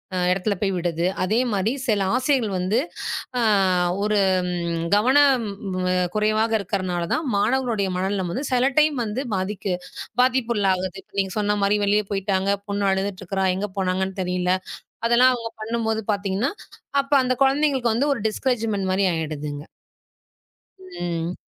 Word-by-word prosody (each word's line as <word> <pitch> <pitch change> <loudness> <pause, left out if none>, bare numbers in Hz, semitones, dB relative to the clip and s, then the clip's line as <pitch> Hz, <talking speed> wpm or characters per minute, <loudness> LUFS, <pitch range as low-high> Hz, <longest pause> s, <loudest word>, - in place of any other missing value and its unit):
அ - - 0
இடத்துல 195 +3 0
போய் 200 -2 0
விடுது. 170 -1 -1 0.2
அதே 215 +5 +1
மாரி 200 +2 +1 0.2
சில 205 -4 +2
ஆசிரியர்கள் 255 -3 +1
வந்து 185 +5 0 0.6
ஆ - - +1 0.6
ஒரு 210 0 +1 0.8
கவனம் 260 +2 +4 0.7
குறைவாக 215 +1 +1
இருக்கறனால 185 -3 -2
தான் 320 - -1
மாணவர்களுடைய 220 -1 +1
மனநிலைமாது 190 +5 -2
சில 255 +1 +3
டைம் 305 -1 +4
வந்து 220 +3 -3
பாதிக்கு 190 0 -2 0.5
பாதிப்புள்ளாகுது. 210 -8 +1
இப்ப - - -41
நீங்க 190 -1 -1
சொன்ன 210 0 +1
மாரி 200 +1 +3
வெளிய 210 +1 +2
போயிட்டாங்க. 195 -1 0 0.2
பொண்ணு 200 -1 +1
அழுதுட்டு 190 0 -2
இருக்கா. 190 +1 -1
எங்க 205 +2 -3
போனாங்கன்னு 190 0 -1
தெரியல. 180 0 0 0.5
அதெல்லாம் 250 +2 +5
அவங்க 230 -1 -6
பண்ணும் 225 +1 -2
போது 220 0 0
பாத்தீங்கன்னா, 200 +6 -1 0.5
அப்ப 275 - -16
அந்த 255 0 +1
குழந்தைகளுக்கு 270 -4 +2
வந்து 280 +6 +1
ஒரு - - -5
டிஸ்கரேஜ்மென்ட் 220 -5 -1
மாரி 190 +1 +1
ஆயிடுதுங்க. 150 -2 -4 1.2
ம். 175 - -4
205 Hz, 135 wpm, -23 LUFS, 190-240 Hz, 1.2 s, அதெல்லாம்